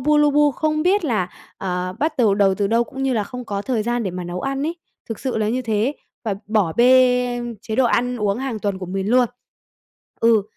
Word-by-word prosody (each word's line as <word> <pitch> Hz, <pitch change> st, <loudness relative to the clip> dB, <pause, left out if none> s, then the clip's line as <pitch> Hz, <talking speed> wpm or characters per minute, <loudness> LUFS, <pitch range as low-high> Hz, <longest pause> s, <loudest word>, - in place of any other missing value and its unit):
bu, 300 Hz, +3 st, +3 dB
lu 295 Hz, 0 st, +5 dB
bu 295 Hz, 0 st, +4 dB
không 310 Hz, +1 st, 0 dB
biết 380 Hz, +2 st, +2 dB
là, 210 Hz, -, 0 dB, 0.3 s
ờ, 180 Hz, -1 st, -2 dB
bắt 310 Hz, +1 st, 0 dB
đầu 215 Hz, -5 st, +4 dB
đầu 195 Hz, -2 st, +3 dB
từ 200 Hz, 0 st, 0 dB
đâu 230 Hz, +3 st, +2 dB
cũng 270 Hz, +3 st, -7 dB
như 265 Hz, -1 st, +1 dB
là 215 Hz, -3 st, 0 dB
không 250 Hz, +1 st, -7 dB
có 200 Hz, -2 st, -3 dB
thời 240 Hz, -3 st, -1 dB
gian 240 Hz, +1 st, -1 dB
để 190 Hz, -, -2 dB
mà 180 Hz, 0 st, -5 dB
nấu 175 Hz, +1 st, -5 dB
ăn 275 Hz, 0 st, -2 dB
ấy. 335 Hz, +1 st, -3 dB, 0.3 s
Thực 225 Hz, -, -4 dB
sự 260 Hz, -2 st, -2 dB
là 215 Hz, 0 st, 0 dB
như 255 Hz, +3 st, -1 dB
thế, 225 Hz, +4 st, 0 dB, 0.3 s
và 205 Hz, -3 st, -1 dB
bỏ 205 Hz, -7 st, +1 dB
bê 250 Hz, 0 st, +4 dB, 0.2 s
chế 220 Hz, -1 st, -5 dB
độ 260 Hz, -, +4 dB
ăn 245 Hz, +1 st, +1 dB
uống 210 Hz, 0 st, 0 dB
hàng 260 Hz, -5 st, -3 dB
tuần 200 Hz, -2 st, -2 dB
của 185 Hz, -, -6 dB
mình 190 Hz, +2 st, -3 dB
luôn. 250 Hz, -2 st, +4 dB, 0.9 s
Ừ, 230 Hz, -3 st, +4 dB
235 Hz, 240 wpm, -21 LUFS, 205-260 Hz, 0.9 s, lu